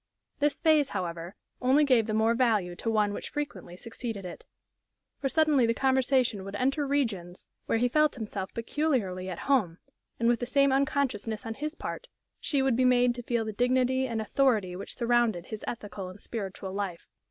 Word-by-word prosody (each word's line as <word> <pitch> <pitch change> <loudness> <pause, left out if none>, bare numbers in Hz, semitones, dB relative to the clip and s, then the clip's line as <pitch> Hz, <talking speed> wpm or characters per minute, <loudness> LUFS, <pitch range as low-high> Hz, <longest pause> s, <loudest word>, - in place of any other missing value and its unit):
This 295 -1 +1
phase, 310 -4 +4
however, 170 0 -5 0.3
only 265 +4 +4
gave 250 -6 +3
the 215 - -1
more 220 +1 +3
value 220 -8 +1
to 225 - -2
one 210 -2 +2
which - - -5
frequently 190 -12 -5
succeeded 225 -2 -6
it. 175 - -9 0.7
For 270 - -1
suddenly 300 -5 +3
the 230 - +1
conversation 260 -5 +2
would 195 +1 -7
enter 275 +5 0
regions 205 -11 -2 0.2
where - - +2
he 245 +2 +2
felt 305 +4 +2
himself 210 -5 -5
peculiarly 230 -8 -1
at 180 - -5
home, 215 -12 +2 0.4
and, 230 - +2
with 240 -1 +3
the 245 - -3
same 275 +2 +3
unconsciousness 265 -5 0
on 225 - -3
his 300 +6 -4
part, - - -6 0.3
she 280 -4 +1
would 265 -3 +2
be 255 - +2
made 250 -1 +4
to 245 - -6
feel 235 -1 -1
the 215 - -4
dignity 255 +3 +2
and 230 -2 -2
authority 215 -7 +1
which 195 - -7
surrounded 235 -7 +1
his 215 +2 -7
ethical 205 -5 -5
and 185 +3 -12
spiritual 195 -4 -6
life. 195 -4 -4
235 Hz, 185 wpm, -28 LUFS, 205-265 Hz, 0.7 s, phase